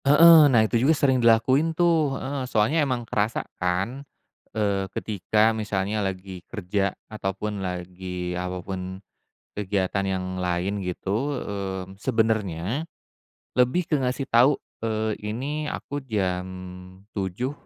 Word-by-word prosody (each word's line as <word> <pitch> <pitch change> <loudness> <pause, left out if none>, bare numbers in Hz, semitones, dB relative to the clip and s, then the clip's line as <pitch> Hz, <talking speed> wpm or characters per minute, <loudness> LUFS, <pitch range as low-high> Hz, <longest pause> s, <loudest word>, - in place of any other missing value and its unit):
Heeh, 155 +1 +9
nah 115 -4 +5
itu 115 +1 +1
juga 150 +4 +4
sering 130 -3 +3
dilakuin 130 +8 +4
tuh, 160 -6 +3
heeh, 135 -1 -4
soalnya 125 +10 +2
emang 125 -4 -1
kerasa 110 0 -1 0.2
kan. 95 +9 0 0.5
Eee 100 -3 0
ketika 110 +2 +2
misalnya 105 -1 -1
lagi 95 -1 -4
kerja 100 -2 -1 0.2
ataupun 105 0 -3
lagi, 90 0 -4
apapun 90 +1 -4 0.6
kegiatan 100 -1 0
yang 95 -1 -1
lain 90 +2 -1
gitu, 105 +10 -1
mmm, 95 -1 -5
sebenernya 110 - 0 0.7
lebih 125 +8 +2
ke 150 - +3
ngasih 135 +1 -2
tahu, 125 +5 +6 0.3
eee, 110 -1 -1
ini 140 +8 -3
aku 145 -1 -4
jam 95 -6 -1 0.7
7.00 100 +7 -2
105 Hz, 120 wpm, -25 LUFS, 95-130 Hz, 0.7 s, Heeh